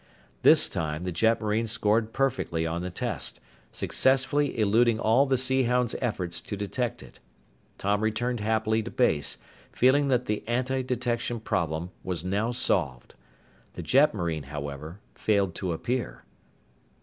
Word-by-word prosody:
This - - +6
time, 75 +1 -3
the 90 - -2
jetmarine 110 +3 +1
scored 110 0 +1
perfectly 130 -12 -1
on 85 +1 -2
the 90 - -4
test, 100 - -3 0.3
successfully 135 +2 +1
eluding 110 +2 +3
all 120 +6 +3
the 130 -1 +2
Sea 130 +1 +1
Hound's 125 0 +1
efforts 95 -8 -2
to 100 - -6
detect 115 +4 -3
it. - - -16 0.6
Tom 100 +1 0
returned 115 +3 -1
happily 110 +1 +1
to 115 - -6
base, 80 - +1 0.3
feeling 140 +3 +3
that 125 -2 +1
the 105 0 -2
antidetection 125 -1 -1
problem 85 -4 -2
was 90 -2 -4
now 105 +5 0
solved. 85 - 0 0.6
The - - -7
jetmarine, 85 - +2
however, 75 +4 -7
failed 100 -4 +1
to 90 0 -3
appear. 120 +9 -3
110 Hz, 135 wpm, -27 LUFS, 90-125 Hz, 0.6 s, This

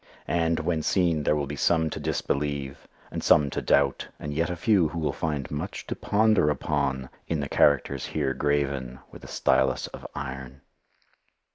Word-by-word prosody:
And, 85 -1 +1
when 80 0 0
seen, 85 -2 +2
there 75 - +2
will 75 -1 -1
be 70 +2 -5
some 80 +1 +2
to - - -4
disbelieve 70 -1 -2 0.2
and - - -4
some 75 -2 +4
to - - -2
doubt, 70 -1 +2
and 75 -1 -5
yet 80 +2 0
a 90 - -2
few 90 -1 +3
who 80 - -7
will 75 -4 -1
find 75 -4 -3
much 75 - -4
to - - -4
ponder 110 -6 +3
upon 65 -3 -1 0.2
in 80 - -1
the 70 - -2
characters 70 -1 +2
here 70 -3 -1
graven 70 -3 -1
with - - -12
a - - -9
stylus 65 0 +1
of - - -9
iron. 65 -1 -6
75 Hz, 175 wpm, -26 LUFS, 70-80 Hz, 0.2 s, some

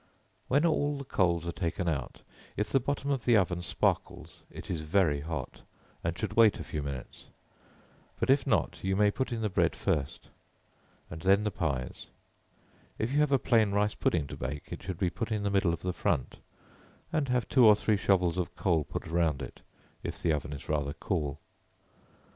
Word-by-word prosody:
When 140 +6 +3
all 145 -3 +1
the 140 - -5
coals 85 - +1
are 85 - -2
taken 85 +1 -2
out, 70 -6 -3 0.4
if 105 0 -1
the 135 - +4
bottom 140 +2 -2
of 135 -4 -1
the 120 -3 +5
oven 90 -3 +1
sparkles, 85 - -2
it - - -10
is 80 - -2
very 80 -2 +2
hot, 75 -3 -5 0.4
and 85 +1 -2
should 110 - -3
wait 115 -2 +5
a - - -4
few 75 - -4
minutes; 70 -3 -7 0.9
but - - +3
if 140 +1 +3
not, 110 - +1
you 95 0 +1
may 105 +1 +4
put 130 +4 -2
in 115 -1 -2
the 110 - +1
bread 95 - +1
first, 75 -3 -2 0.8
and 80 - -7
then 100 +3 +4
the 105 - 0
pies; 70 -8 -3 0.9
if 110 +3 -1
you 145 - +2
have 150 -1 +3
a 135 - +5
plain 110 -6 +2
rice 105 +1 +2
pudding 80 -4 0
to - - -7
bake, 70 +3 -5
it - - -6
should 95 -3 -5
be 90 -2 0
put 115 +2 -4
in 105 -1 -1
the 100 - 0
middle 95 -3 +3
of 85 0 -4
the 90 0 -1
front, - - -1 0.8
and 145 -4 0
have 125 -1 +1
two 125 -4 +6
or 105 - +8
three 105 +1 +1
shovels 90 -3 +2
of 90 - -3
coals 85 -5 +1
put - - -4
round 80 -4 +1
it, - - -9 0.4
if - - -5
the 80 - +1
oven 75 -1 -3
is 70 -2 -8
rather 75 -2 -1
cool. 75 -5 -2
95 Hz, 200 wpm, -30 LUFS, 80-110 Hz, 0.9 s, or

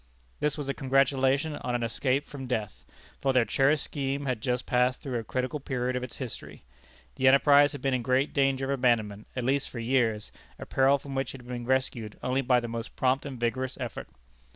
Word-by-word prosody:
This 150 0 0
was 145 -2 -4
a 140 - 0
congratulation 135 +2 +2
on 125 - -3
an 120 - -1
escape 130 +5 0
from 135 -3 -8
death, 110 -5 -3 0.4
for 135 -1 +2
their 125 -2 +4
cherished 140 +6 +2
scheme 140 -1 -3
had 125 -5 -2
just 125 +1 -1
passed 125 +1 +2
through 130 -4 -3
a - - -5
critical 130 +6 -2
period 125 -2 -2
of 125 - -1
its 125 -1 -7
history. 130 -4 -8 0.5
The 130 - +3
enterprise 145 +2 +6
had 145 - -8
been 135 -1 +1
in 125 - +1
great 130 +4 +1
danger 135 -1 +2
of 135 - -2
abandonment 110 -4 +1
at 125 - -2
least 135 +2 +1
for - - -9
years, 115 -3 0 0.3
a - - -8
peril 135 +1 +3
from 140 0 -9
which 135 0 -2
it 130 - -10
had 120 - -16
been 120 -1 -5
rescued 125 -4 -1
only 130 +2 +1
by 125 -1 +3
the 120 - -5
most 115 0 -6
prompt 130 +2 +1
and 130 -3 -7
vigorous 130 +2 -1
effort. 120 -3 -5
130 Hz, 215 wpm, -28 LUFS, 120-135 Hz, 0.5 s, enterprise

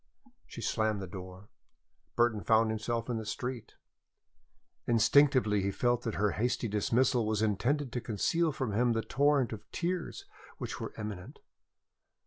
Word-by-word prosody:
She - - -9
slammed 110 -2 0
the 95 - -4
door. 95 +1 -10 0.6
Burton 120 -3 +2
found 110 +4 +3
himself 115 +1 -2
in 120 -2 -1
the 110 - -4
street. 125 -2 -5 1.1
Instinctively 115 -2 +4
he 100 - 0
felt 120 +4 +1
that 115 -3 -3
her 105 0 +1
hasty 120 +1 -1
dismissal 120 +4 +2
was 110 0 0
intended 120 +6 0
to 125 - -2
conceal 155 - 0
from 130 -5 -3
him 120 +2 +2
the 115 0 -1
torrent 140 -2 +2
of 105 - -10
tears 175 -1 -3 0.3
which - - -5
were - - -6
imminent. 105 -4 -6
115 Hz, 145 wpm, -31 LUFS, 105-125 Hz, 1.1 s, Instinctively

